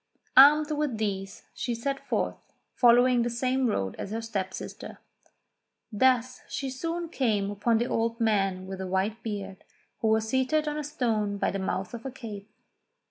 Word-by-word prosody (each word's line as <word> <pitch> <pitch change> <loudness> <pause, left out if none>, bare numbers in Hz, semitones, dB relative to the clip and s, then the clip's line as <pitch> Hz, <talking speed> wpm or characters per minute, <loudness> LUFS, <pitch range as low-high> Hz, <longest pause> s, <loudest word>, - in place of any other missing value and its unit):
Armed 295 +3 +8
with 295 -6 -1
these 195 -2 -3
she 240 -2 -3
set 275 +4 -2
forth, - - -2 0.2
following 245 0 +5
the 240 - 0
same 255 +2 0
road 95 - -1
as - - -4
her 220 +2 -3
step 205 -5 -3
sister. - - -8 0.9
Thus 255 +2 +2
she 270 -1 -3
soon 335 +6 -3
came 215 -10 0
upon 215 +3 +1
the 235 - +1
old 230 -1 -1
man 195 -4 +1
with 190 0 -6
a 190 - -4
white 195 +5 -1
beard, 200 -3 -6 0.4
who 225 - 0
was 220 0 +2
seated 260 +6 +1
on 300 0 -2
a - - -3
stone 225 -8 -1
by - - 0
the 195 - -3
mouth 190 +1 -3
of 235 -1 -7
a 270 - -4
cave. 215 -6 -8
230 Hz, 175 wpm, -28 LUFS, 200-260 Hz, 0.9 s, Armed